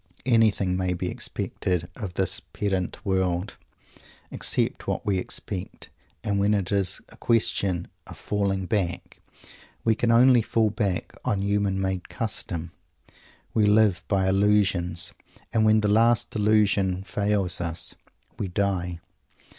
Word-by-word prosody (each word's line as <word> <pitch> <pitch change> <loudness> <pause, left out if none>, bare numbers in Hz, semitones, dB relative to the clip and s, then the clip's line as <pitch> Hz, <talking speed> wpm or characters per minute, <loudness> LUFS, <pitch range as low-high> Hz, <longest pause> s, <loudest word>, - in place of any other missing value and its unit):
Anything 110 -6 +3
may 90 -1 0
be - - -3
expected 90 -2 -3
of 95 -5 -6
this 95 -1 0
"pendant 95 0 -3
world," 95 -1 -1 0.7
except - - +1
what - - -2
we 95 -2 +1
expect; 90 0 -5 0.3
and 100 -1 0
when 105 +1 +3
it 95 -4 -2
is 100 -3 0
a - - -13
question 100 -6 +1 0.2
of - - -10
"falling 100 -2 -1
back," 90 -4 -2 0.6
we 115 - +3
can 115 +2 0
only 120 +1 +6
fall 110 -1 +1
back 100 -5 -2
on 100 -1 0
human 100 -1 0
made 95 -1 -2
custom. 85 -6 -3 0.8
We 105 -2 +3
live 105 -3 +4
by 95 -2 +1
Illusions, 95 -3 +2 0.4
and 110 -1 +3
when 110 0 +5
the 105 - +1
last 115 +3 +3
Illusion 100 -3 +2
fails 100 -3 0
us, 85 -1 -2 0.5
we 100 - -1
die. 90 -2 -1
100 Hz, 130 wpm, -25 LUFS, 90-105 Hz, 0.8 s, only